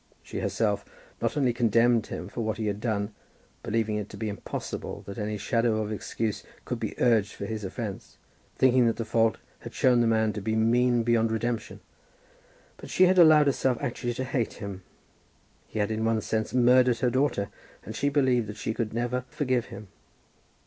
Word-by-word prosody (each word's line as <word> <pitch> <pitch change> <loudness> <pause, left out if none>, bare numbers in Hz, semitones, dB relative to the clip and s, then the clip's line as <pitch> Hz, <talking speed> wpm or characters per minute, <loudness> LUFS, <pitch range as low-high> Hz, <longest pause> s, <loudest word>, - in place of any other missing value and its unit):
She, - - -6
herself, - - 0 0.4
not - - -1
only 130 -4 +2
condemned 115 -1 +3
him 90 - -6
for 115 - -5
what 110 -1 -2
he 110 - -3
had 105 0 -2
done, 105 -2 -1 0.5
believing 110 -1 -1
it 105 -1 -4
to - - -10
be 110 -1 -3
impossible 100 - -6
that 100 +2 -7
any 105 0 -2
shadow 115 +1 +1
of 110 0 -3
excuse 110 0 -3 0.2
could - - -3
be - - -5
urged 115 -5 +3
for - - -6
his 110 0 -4
offence, 100 0 -6 0.4
thinking 130 -2 +4
that 115 - +1
the 115 - -4
fault 115 0 +2 0.2
had - - -10
shown 125 -2 +4
the 120 - +3
man 110 -1 +2
to 105 - -5
be 110 +3 -1
mean 120 +2 +3
beyond 115 -1 +2
redemption, 115 0 -3 1.0
but - - -11
she 185 - +3
had 185 0 +4
allowed 155 -3 +7
herself 130 -3 +1
actually 120 -3 -3
to 130 - -2
hate 125 -3 -1
him. 100 -3 -7 0.9
He - - -8
had 105 0 0
in 110 0 -1
one 115 -1 +1
sense 110 0 -2
murdered 125 -1 +4
her 125 -2 +2
daughter, 130 -6 0 0.4
and 110 - -7
she 140 - +1
believed 130 -5 +2
that 105 +1 -7
she 110 - -2
could 110 -1 -3
never 120 +1 -1
forgive 130 -5 0
him. 105 -3 -10
115 Hz, 190 wpm, -27 LUFS, 110-125 Hz, 1.0 s, allowed